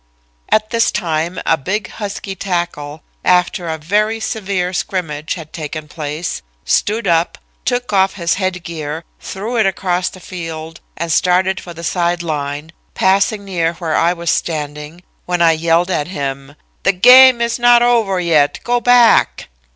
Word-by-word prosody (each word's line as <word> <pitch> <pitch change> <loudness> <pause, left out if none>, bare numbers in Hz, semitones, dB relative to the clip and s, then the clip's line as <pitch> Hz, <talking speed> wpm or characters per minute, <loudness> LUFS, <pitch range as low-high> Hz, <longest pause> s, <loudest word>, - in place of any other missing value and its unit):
"At 215 0 +1
this 230 -1 +2
time, 165 +1 -2
a 165 - +3
big 190 +7 -3
husky 200 -2 -6
tackle, 170 -6 -4 0.2
after 180 -1 +2
a 160 - -2
very 210 +8 0
severe 190 -5 -2
scrimmage 165 -6 -3
had 160 -3 -10
taken 155 -1 -6
place, 150 +1 -5 0.2
stood 215 +2 0
up, 170 -1 +1 0.3
took 245 -3 -1
off 190 0 +3
his 170 -3 0
head 185 -2 -2
gear, 160 -1 -5 0.2
threw 220 +5 -5
it 220 -3 +3
across 180 -1 -1
the 185 - -13
field 165 -3 -7 0.2
and 170 +1 -3
started 185 +3 +2
for 175 -1 -10
the 170 - -9
side 175 0 0
line, 150 -1 -4 0.2
passing 200 +2 +2
near 170 -4 -1
where 165 -2 -2
I 170 - +3
was 170 -1 -2
standing, 150 +1 -4 0.2
when 180 0 -1
I 170 -1 +5
yelled 165 +3 +1
at 150 -4 -1
him: 140 -4 -5 0.3
"'The 195 - +2
game 250 +5 +8
is 235 +1 -1
not 240 0 +6
over 225 -6 +2
yet. 160 -5 +2
Go 245 0 +1
back.' 245 0 +4
175 Hz, 160 wpm, -17 LUFS, 160-200 Hz, 0.3 s, game